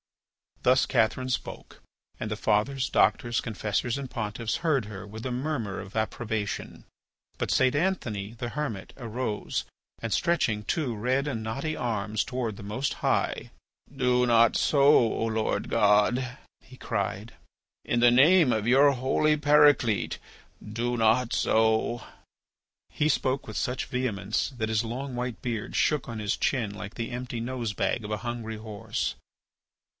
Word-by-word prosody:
Thus - - +4
Catherine 130 +4 +1
spoke, 125 - -5 0.4
and - - -3
the - - -2
fathers, 130 +5 +1
doctors, 120 -1 +2
confessors, 110 +2 -2
and 135 -2 -6
pontiffs 110 0 -3
heard 150 -9 +1
her 100 -1 -8
with 110 +3 -8
a - - -3
murmur 125 -6 -2
of 95 - -9
approbation. 110 -1 -3 0.5
But - - -1
St. 130 +1 +3
Anthony, 120 - -1
the 120 +1 -5
Hermit, 120 -9 -4
arose 115 -3 -3 0.4
and 115 - -4
stretching 160 - +1
two 130 0 -1
red 130 +6 0
and 115 -6 -2
knotty 135 +8 -3
arms 110 -2 -1
towards 120 -5 -3
the 105 - -9
Most 125 +8 -2
High: - - 0 0.4
"Do 125 -1 +2
not 115 -1 +5
so, 140 - +2
O 120 -6 +4
Lord 110 -1 -1
God," 120 +6 +2 0.2
he 130 0 -16
cried, 100 -1 -3 0.5
"in 120 - 0
the 120 0 +6
name 150 +3 +6
of 110 -1 0
your 140 +3 +6
holy 140 +4 +1
Paraclete, 145 -7 +4 0.5
do 120 +3 -2
not 115 +2 +3
so!" 110 +1 +2 0.9
He 150 - 0
spoke 130 -2 0
with 110 - -6
such 125 +1 -1
vehemence 110 -5 -1
that 110 -1 -1
his 110 0 +1
long 125 +3 -5
white 125 -1 -4
beard 115 -4 -3
shook 150 -5 +1
on 115 - -5
his 105 -2 -1
chin 115 -7 0
like 105 0 -8
the 115 +1 -4
empty 125 -1 -4
nose 120 -2 -3
bag 110 - -1
of 105 - -6
a 105 - 0
hungry 115 -2 -4
horse. 110 0 -4
120 Hz, 150 wpm, -27 LUFS, 110-130 Hz, 0.9 s, the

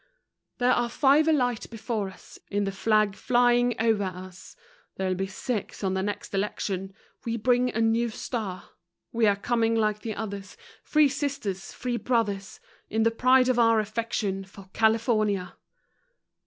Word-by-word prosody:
There 245 0 +3
are 240 -1 +2
five 285 +5 +4
a - - +5
light 245 -6 0
before 220 -3 -3
us, 190 - -15
In 205 0 0
the 195 - -1
flag 215 0 +2
flying 245 -1 +2
o'er 225 -2 +2
us, 185 0 -9 0.4
There'll 190 -1 -1
be 190 +1 -2
six 210 +2 -4
on 190 -1 0
next 195 +2 -3
election 195 -1 -2 0.3
We 230 0 -2
bring 245 +2 +2
a 225 - -2
new 225 +1 +2
star! 215 -5 -5 0.4
We 230 -2 +2
are 200 - +4
coming 230 +2 +1
like 215 -2 +1
the 220 -1 -5
others, 200 - -6 0.3
Free 305 -1 +4
Sisters, 270 -9 -3
Free 245 -1 -3
Brothers, 210 -5 -1 0.3
In 220 +1 +1
the 230 - +3
pride 255 +2 +4
of 255 -2 +2
our 230 -1 +5
affection 215 -2 -2
For 195 0 -15
California. 220 -4 +1
220 Hz, 155 wpm, -26 LUFS, 200-240 Hz, 0.4 s, a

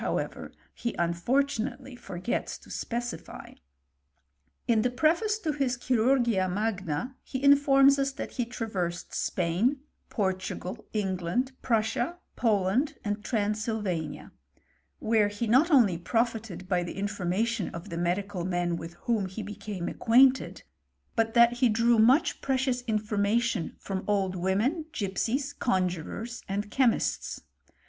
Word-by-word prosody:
ever, - - -3 0.2
he 235 - -4
unfortunately 250 +8 -1
forgets 190 0 -4
to - - -16
specify. 240 0 -5 1.1
In 230 -3 +4
the 250 - +2
preface 330 - +2
to 330 -8 -2
his 270 -4 -1
Chirurgia 240 -5 +2
Magna, 195 - -2
he 260 - -5
infomu^ 280 -1 +6
us 275 0 +1
that - - -6
he 245 - -2
traversed 200 -8 -4
Spain, 190 +11 0 0.3
Portugal, 190 +1 -3
England, 195 +4 -1
Pruft 220 -3 +1
* - - -4
sia, 345 +1 -2 0.2
Poland, 220 +5 +1
and 205 0 -2
Transylvania; 210 -6 -2 0.7
where 220 -2 +2
he 205 +3 -3
not 255 +9 +5
onlj^ 215 - +4
profited 225 -5 -1
by 180 -1 +1
the 175 - -6
information 205 +2 -1
of 170 +4 -8
the 170 - -5
medical 180 +1 -1
men 175 -1 -1
wit& 165 +1 -8
^bofH 200 -6 0
be 220 - -4
became 205 -3 -5
acquainted, 255 +3 +3 0.5
but 225 0 +1
that 235 0 +7
he 250 - +4
drew 230 +1 +3
mueb 265 +10 +4
pjrecioitg 260 -2 0
iafonxiation 215 -2 0
from 190 -1 -4
old 195 -3 +1
women, 210 - 0
gipsies, 245 +6 -1
con<r 185 -6 +2
juffQfs, 235 +6 -6
and 205 +2 -3
chemists. 255 -4 +1
220 Hz, 130 wpm, -28 LUFS, 190-250 Hz, 1.1 s, that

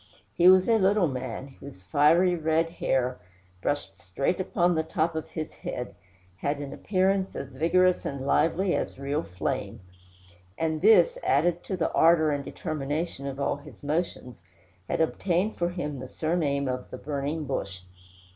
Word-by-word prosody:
He 175 - +4
was 185 0 +7
a 225 -1 +4
little 195 -1 +3
man, 130 0 -6
whose 135 -10 -11
fiery 155 - +4
red 160 0 +1
hair, 130 -6 -1 0.4
brushed 95 -9 -2
straight 135 - -2
upon 180 -1 +1
the 160 - +1
top 160 0 -1
of 160 -1 -5
his 155 -1 -5
head, 125 - -6 0.4
had 140 +8 -1
an 140 -1 -6
appearance 190 0 0
as 140 0 -6
vigorous 175 +6 +2
and 140 -1 -4
lively 175 +6 +2
as - - -3
real 140 +3 -1
flame; 100 - -4 0.8
and 160 -1 -1
this, 225 - +5
added 175 0 +2
to 190 - -3
the 165 - 0
ardor 160 -2 +5
and 145 -1 -2
determination 150 -1 -4
of 135 0 -5
all 140 - 0
his 145 -2 -14
motions, 145 - -3 0.5
had - - 0
obtained 180 +5 0
for 175 0 +1
him 150 -6 -4
the 130 - -7
surname 145 -2 -1
of 125 0 -4
the - - -7
"Burning 145 +2 -3
Bush." 100 -9 -4
155 Hz, 160 wpm, -27 LUFS, 140-175 Hz, 0.8 s, was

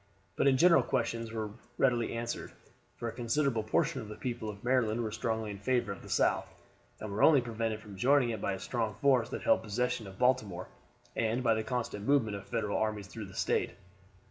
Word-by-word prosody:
But - - +2
in 135 -1 +5
general 170 +3 +6
questions 115 -3 -1
were 110 -2 -3 0.3
readily 120 -3 +2
answered; 115 0 -4 0.4
for 120 - -4
a - - -2
considerable 120 0 0
portion 110 +4 0
of 105 - -9
the 105 - -7
people 120 -3 -4
of 100 0 -9
Maryland 120 -2 +2
were 110 - -3
strongly 110 -2 -2
in 100 - -7
favor 120 0 0
of 100 - -7
the - - -12
South, - - +2 0.5
and 110 - -6
were 100 - -2
only 150 -3 +7
prevented 115 -2 -2
from 105 -2 -11
joining 130 +2 +4
it 110 -3 -4
by 100 - 0
the - - -8
strong 110 -2 -2
force 125 -1 +3
that - - -5
held - - +4
possession 110 0 -1
of 95 0 -11
Baltimore, 125 -8 +1 0.5
and 115 +2 0
by 115 -2 +4
the 110 - 0
constant 115 -4 -3
movement 120 -8 +3
of 100 0 -8
Federal 110 -4 -1
armies 110 -2 -1
through 110 +2 -7
the 95 -1 -12
State. - - 0
115 Hz, 210 wpm, -31 LUFS, 105-125 Hz, 0.5 s, only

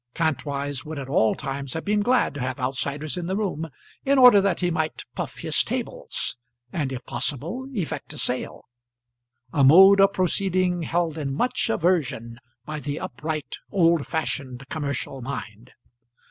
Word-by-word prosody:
Kantwise 145 -3 -1
would 160 -1 -7
at 135 -2 -5
all 110 -5 +3
times 140 -1 -4
have 160 - -4
been 210 +1 +2
glad 245 +4 +2
to 145 - -7
have 130 +2 -3
outsiders 140 +5 -1
in 175 -1 -3
the 190 - -1
room, 180 -6 -2 0.3
in 275 0 +3
order 250 -6 +8
that 195 -2 +1
he 175 -1 +1
might 160 -2 -2
puff - - -5
his - - +2
tables, - - -3 0.4
and 145 -5 -1
if 130 -2 -6
possible 170 - -1
effect 180 -7 -4
a - - -9
sale; 125 -1 -2 0.9
a 140 - +3
mode 190 +8 +8
of 195 0 +5
proceeding 185 -1 +1
held 165 -1 -1
in 140 -2 -2
much 245 - 0
aversion 140 - 0 0.3
by 155 0 -5
the 145 +1 -4
upright, 155 +3 -4
old 170 -5 +3
fashioned, 140 -5 -3
commercial 140 -3 -3
mind. 120 -2 -7
155 Hz, 160 wpm, -24 LUFS, 135-180 Hz, 0.9 s, order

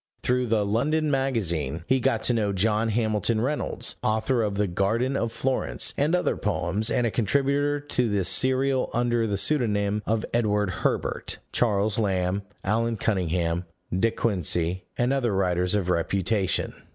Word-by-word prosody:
Through 125 0 +1
the 110 -2 +1
London 150 +9 +1
Magazine, 90 - -1
he 130 0 +2
got 115 -2 0
to 120 - +4
know 105 -3 0
John 110 +3 +1
Hamilton 110 0 +1
Reynolds 140 +6 -2
(author 110 +3 +1
of 105 -2 -1
the 105 +1 +1
Garden 110 +8 0
of 115 -4 -1
Florence 130 +2 -1
and 150 +5 +2
other 180 -4 0
poems, 100 +3 -1
and 120 - +1
a 115 - 0
contributor 140 +6 +1
to 125 -5 -1
this 100 -3 +1
serial 130 +5 +2
under 120 -1 +1
the 100 -2 -1
pseudonym 105 -6 +1
of 110 0 0
Edward 105 -4 +1
Herbert), - - -2
Charles 105 -2 +1
Lamb, 95 -2 0 0.2
Allan 115 +3 0
Cunningham, 90 -4 -1 0.3
De 115 +5 +3
Quincey, 90 -5 0
and 125 +2 +1
other 120 -7 0
writers 90 0 +1
of 100 -4 0
reputation. 95 +3 0
110 Hz, 150 wpm, -25 LUFS, 95-125 Hz, 0.3 s, to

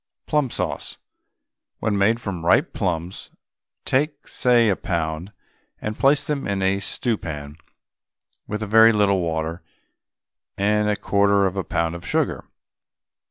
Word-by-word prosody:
PLUM 150 -4 +1
SAUCE. - - -4 0.8
When 105 - -1
made 105 +4 +2
from 100 -7 -5
ripe 135 - +3
plums, 90 -2 -3 0.6
take, 145 +2 0
say, 120 -2 +3
a 95 - +2
pound, 85 +1 -3 0.5
and 110 0 -4
place 140 +1 +3
them 145 -2 -2
in 100 -1 -1
a 95 +1 +2
stew 115 +2 -1
pan 75 -3 -7 0.9
with 105 +1 -3
a - - -2
very 110 +2 +6
little 100 -3 +2
water 80 0 -2 1.0
and 105 +1 +2
a 105 - +2
quarter 100 0 +2
of 95 0 -1
a 95 - -1
pound 85 -1 -1
of 85 0 -8
sugar. - - -1
100 Hz, 140 wpm, -23 LUFS, 85-110 Hz, 1.0 s, very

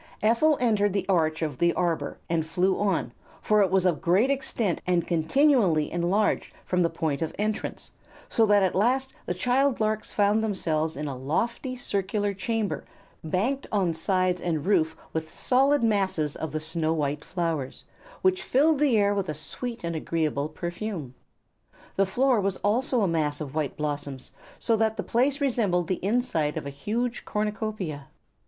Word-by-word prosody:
Ephel 255 +8 +4
entered 210 -5 +2
the 200 -2 -1
arch 160 -4 +1
of 150 -5 -3
the 170 0 +3
arbor 170 -3 -1
and 165 -1 0
flew 180 +4 0
on, 195 -11 0 0.3
for 210 0 +3
it 195 - +3
was 190 0 +2
of 170 -6 +1
great 195 +10 +3
extent 235 - -1
and 175 -2 +2
continually 175 - +3
enlarged 180 +5 0
from 180 0 +1
the 170 - +3
point 155 -3 -2
of 160 - -3
entrance, 215 +1 -3 0.4
so 225 - +2
that 205 -1 +5
at 185 - +1
last 255 +7 +1
the - - 0
child 250 +6 +2
larks 215 0 -1
found 205 +1 +2
themselves 160 -7 -1
in 150 +1 -3
a 140 - -4
lofty 230 - -2
circular 205 -3 -1
chamber 215 +2 -2 0.4
banked 210 - -1
on 190 -5 +1
sides 185 +1 0
and 160 -4 -1
roof 165 -5 +2 0.2
with 160 0 -3
solid 270 +1 +2
masses 190 -9 +1
of 160 - -4
the 155 - -2
snow 160 0 -1
white 145 -2 -1
flowers, 165 -7 -3 0.4
which 375 -1 +3
filled 295 +1 +3
the 280 -6 +3
air 205 -1 +3
with 195 -3 -2
a 155 - -2
sweet 235 - -5
and 170 -1 -2
agreeable 155 -2 -1
perfume. 175 - -5 0.8
The 195 0 +2
floor 250 +2 +2
was 195 -1 -1
also 245 +4 +2
a 200 - +3
mass 155 -3 0
of 140 -3 -6
white 155 -3 -2
blossoms, 145 -3 -4 0.3
so 230 - +1
that 220 0 +1
the - - -2
place 265 +4 +1
resembled 210 - +1
the 185 - -2
inside 195 -9 0
of - - -4
a 140 - -4
huge 230 - -2
cornucopia. 210 -8 -3
190 Hz, 170 wpm, -26 LUFS, 160-225 Hz, 0.8 s, that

